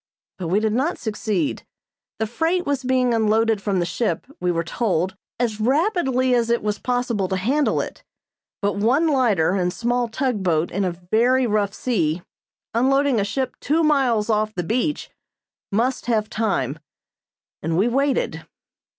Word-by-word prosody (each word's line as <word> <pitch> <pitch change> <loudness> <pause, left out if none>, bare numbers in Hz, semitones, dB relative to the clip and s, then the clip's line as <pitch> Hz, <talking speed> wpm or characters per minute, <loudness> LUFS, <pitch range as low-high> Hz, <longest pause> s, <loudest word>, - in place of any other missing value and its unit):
But 180 - -3
we 190 +5 +2
did 215 0 0
not 275 +9 0
succeed. 220 +3 -2 0.5
The 220 - 0
freight 325 +10 0
was 280 -2 -1
being 255 -1 +2
unloaded 220 -1 +2
from 200 -2 0
the 175 - +1
ship, 175 -1 -1
we 180 0 +1
were 165 -1 -1
told, 185 -1 -1 0.2
as 225 -3 -1
rapidly 265 - +2
as 235 -1 +2
it 235 -2 +1
was 210 -1 -1
possible 245 -6 -1
to 190 - -1
handle 265 +11 +1
it, - - -8 0.6
but 200 0 0
one 255 +10 +3
lighter 230 - +2
and 180 -2 0
small 240 +4 0
tug 240 -2 -1
boat 170 -3 +1
in 195 +2 0
a 180 - 0 0.2
very 250 +4 +4
rough 205 -3 0
sea, 175 -9 0 0.5
unloading 270 +1 +3
a - - +2
ship 250 +5 -2
two 320 +3 +1
miles 265 -8 +2
off 215 -1 0
the 175 - -2
beach, 250 - -1 0.6
must 240 +5 0
have 215 -3 0
time; 160 - -1 0.8
and 165 +1 -1
we 200 +5 +3
waited. 270 +2 0
225 Hz, 160 wpm, -22 LUFS, 200-255 Hz, 0.8 s, very